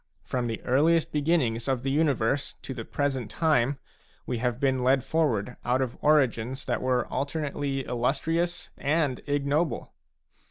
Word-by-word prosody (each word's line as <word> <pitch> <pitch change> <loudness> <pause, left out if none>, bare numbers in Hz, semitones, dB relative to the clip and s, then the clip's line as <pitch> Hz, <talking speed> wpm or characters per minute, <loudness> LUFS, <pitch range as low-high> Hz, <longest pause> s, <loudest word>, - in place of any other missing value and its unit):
From 125 -2 -2
the 115 -1 -3
earliest 155 +6 +3
beginnings 140 -7 +1
of 130 -2 0
the 135 - 0
universe 140 -3 +1
to 135 - -5
the 120 -3 -6
present 135 -3 -2
time, 145 -4 +2 0.5
we 120 - -2
have 125 0 -1
been 130 -2 +1
led 130 0 +3
forward 125 -8 0
out 125 +2 +1
of 130 -2 -1
origins 130 -4 +2
that 120 -3 -1
were 125 -1 +2
^ - - -15
alternately 140 -1 -2
illustrious 155 +8 -1
and 145 -2 +1
ignoble. 145 +3 0
135 Hz, 150 wpm, -27 LUFS, 125-150 Hz, 0.5 s, earliest